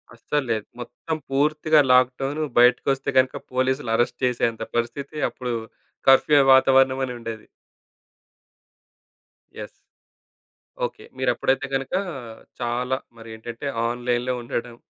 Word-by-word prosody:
అస్సలు 145 +4 -2
లేదు. 110 -2 -1
మొత్తం 120 +6 -5
పూర్తిగా 150 +3 +2
లాక్‌డౌను 130 +4 +2 0.2
బయటికొస్తే 135 +2 +3
గనుక 130 0 +3 0.2
పోలీసులు 130 -1 0
అరెస్ట్ 120 - 0
చేసేంత 115 -2 0
పరిస్థితి. 120 +5 -3
అప్పుడు 125 -2 -5 0.6
కర్ఫ్యూ 145 +2 +6
వాతావరణమని 130 -1 +4
ఉండేది. 115 -2 -7 2.1
యెస్! - - -7 1.2
ఓకే. - - -8
మీరెప్పుడైతే 135 - 0
గనుక, 135 0 -3 0.7
చాలా 125 +2 -1 0.2
మరేంటంటే 115 +3 -8 0.2
ఆన్‌లైన్‌లో 120 +1 -1
ఉండడం, 120 0 -5
125 Hz, 95 wpm, -23 LUFS, 120-135 Hz, 2.1 s, కర్ఫ్యూ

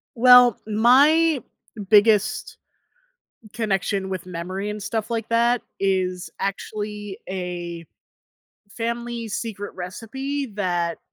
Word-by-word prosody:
Well, 250 -1 +7
my 275 +8 +4 0.5
biggest 215 0 +3 1.0
connection 195 -3 -1
with 185 -2 -5
memory 185 +3 -5
and 210 0 -5
stuff 220 +2 -3
like 230 -1 -2
that 235 +1 +2 0.2
is 185 -2 -1
actually 205 +1 -4
a 175 -2 -5 0.9
family 235 0 -3
secret 205 -1 -5
recipe 265 +10 -5
that 175 -5 -2
210 Hz, 90 wpm, -23 LUFS, 190-235 Hz, 1.0 s, Well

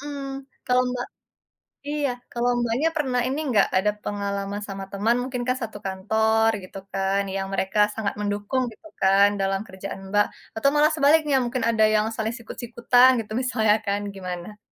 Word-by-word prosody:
Mhm, 290 0 -6 0.5
kalau, 250 0 +4
Mbak 250 0 -3 0.8
iya. 295 -2 0 0.2
Kalau, 240 +1 0
Mbaknya 240 +7 +1
pernah 260 -6 0
ini 270 +3 -2
enggak, 210 -5 +4
ada 210 +3 +2
pengalaman 200 0 -3
sama 195 -1 -6
teman, 210 +4 +1
mungkin 250 -1 -3
kan 255 0 +1
satu 225 -4 -6
kantor 220 +4 +2
gitu 185 +1 -10 0.2
kan, 195 +1 +1
yang 195 0 -2
mereka 195 +2 -1 0.2
sangat 215 -3 -2
mendukung 205 +5 -1
gitu 320 +9 -15
kan 195 +1 +6
dalam 195 +1 -1
kerjaan, 190 +1 -7
Mbak, 205 0 +5 0.3
atau 275 +5 +2
malah 300 +2 +5
sebaliknya, 300 -1 +4
mungkin 245 0 -2
ada 220 -1 +3
yang 210 - +3
saling 220 +1 -2
sikut-sikutan 240 +2 +3 0.2
gitu 215 - -8
misalnya 220 -5 +2
kan 200 0 0
gimana? 185 +2 -6
220 Hz, 165 wpm, -24 LUFS, 200-250 Hz, 0.8 s, kan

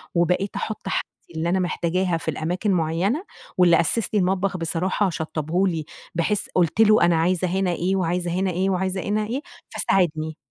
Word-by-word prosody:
وبقيت 180 +3 +1
أحُطّ 215 - -4
حاجتي - - -1 0.3
اللي 160 +2 -1
أنا 190 - +2
محتاجاها 180 0 0
في 165 - -10
الأماكن 175 +7 -1
مُعيّنة، 180 - 0 0.3
واللي 175 -2 +5
أسِّس 220 +6 -1
لي 210 - +3
المطبخ 190 +1 0
بصراحة 180 +4 0
شطّبه 160 +3 -1
لي، 165 -4 -2 0.3
بحيث 200 +5 0
قُلت 180 +4 +2
له 215 0 +6
أنا 170 - +3
عايزة 180 +2 +1
هنا 185 +1 0
إيه، 180 +3 0
وعايزة 175 -1 -1
هنا 185 +1 0
إيه، 185 +2 0
وعايزة 190 0 -1
هنا 210 +2 -1
إيه، 250 +5 -2 0.3
فساعدني. 160 -4 0
180 Hz, 170 wpm, -23 LUFS, 165-195 Hz, 0.3 s, له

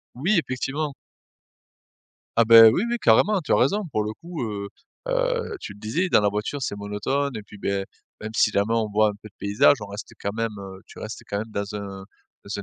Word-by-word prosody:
Oui 175 - +1
effectivement. 140 +3 -3 1.4
Ah 115 - +6
beh, 115 -1 +10
oui 145 - +1
oui 240 - 0
carrément, 180 - +4
hein, - - -1
tu 145 - -4
as - - +6
raison 200 +12 +2
pour 110 - 0
le 105 +1 -4
coup 165 +4 -7
heu, 100 -3 -4 0.4
heu, - - 0
tu - - -8
le 100 - -17
disais 155 - -1
dans - - +5
la 105 - +3
voiture 105 +8 -3
c'est 115 - -2
monotone 105 +7 -2
et 110 - -5
puis, 105 - -14
beh, 100 -1 -2 0.4
même 110 - -5
si 105 - +4
la 100 - +2
main 115 +2 0
on 110 -2 0
voit 105 +1 +3
un - - -4
peu - - -10
de - - -37
paysages 100 +7 +4
on 105 - -6
reste 100 +2 -8
quand 100 - -2
même, 115 0 -2
heu 95 -1 -9
tu - - -13
restes 110 0 -7
quand 100 - -2
même 110 +2 -6
dans 100 0 -4
un 100 -2 -7 0.4
dans 100 0 -4
110 Hz, 235 wpm, -24 LUFS, 100-140 Hz, 1.4 s, beh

